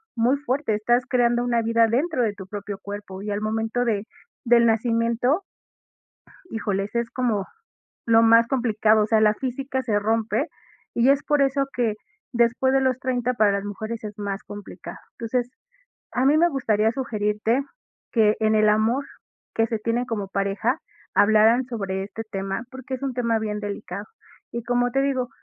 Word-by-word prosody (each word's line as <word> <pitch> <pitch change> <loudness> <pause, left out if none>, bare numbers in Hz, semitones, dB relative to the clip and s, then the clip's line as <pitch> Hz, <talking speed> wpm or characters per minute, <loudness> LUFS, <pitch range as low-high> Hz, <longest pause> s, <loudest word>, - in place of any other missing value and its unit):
muy 240 +3 +3
fuerte, 275 -3 -1
estás 240 +4 +2
creando 240 -1 +2
una 240 -1 +1
vida 230 0 +3
dentro 270 +5 0
de 215 -3 0
tu 195 -2 -10
propio 205 0 -6
cuerpo, 200 -2 -7
y 210 - -5
al 205 - -1
momento 225 +3 -1
de 215 -3 0 0.4
del 235 0 +5
nacimiento 230 - +1 1.1
híjoles, 205 -3 -2
es 235 0 0
como 230 -6 0 0.6
lo 230 0 +5
más 230 +1 +6
complicado, 220 -4 +2
o - - +1
sea, 220 0 +3
la 210 -1 +5
física 260 +2 -3
se 215 -5 +1
rompe, 225 +7 0 0.5
y 240 +3 +3
es 280 0 +3
por 295 -1 +2
eso 275 0 +2
que 235 -4 +1 0.4
después 240 +2 +2
de 270 - +3
los 260 -1 +1
30 250 -1 -1
para 215 -4 +3
las 200 0 -1
mujeres 220 +3 -5
es 210 -1 -7
más 200 -1 -4
complicado. 190 -4 -9 0.2
Entonces, 245 +1 -2 0.6
a 255 - +1
mí 285 +3 +5
me 340 +2 +5
gustaría 225 -7 +1
sugerirte 225 -1 0 0.5
que 215 -2 +4
en 220 0 +3
el 215 0 +4
amor 220 +6 +2 0.5
que 225 - +2
se 225 -1 -2
tienen 230 +3 -1
como 220 -5 -4
pareja, 200 +7 0 0.4
hablaran 220 +4 +5
sobre 195 -6 -3
este 210 +3 -7
tema, 195 +1 -3
porque, 260 0 -6
es 260 - -7
un 270 -2 -2
tema 235 -2 +1
bien 210 -1 -3
delicado. 205 -1 -5 0.5
Y 235 - -3
como 245 0 +1
te 270 +2 +1
digo, 260 -3 0
230 Hz, 170 wpm, -24 LUFS, 210-250 Hz, 1.1 s, más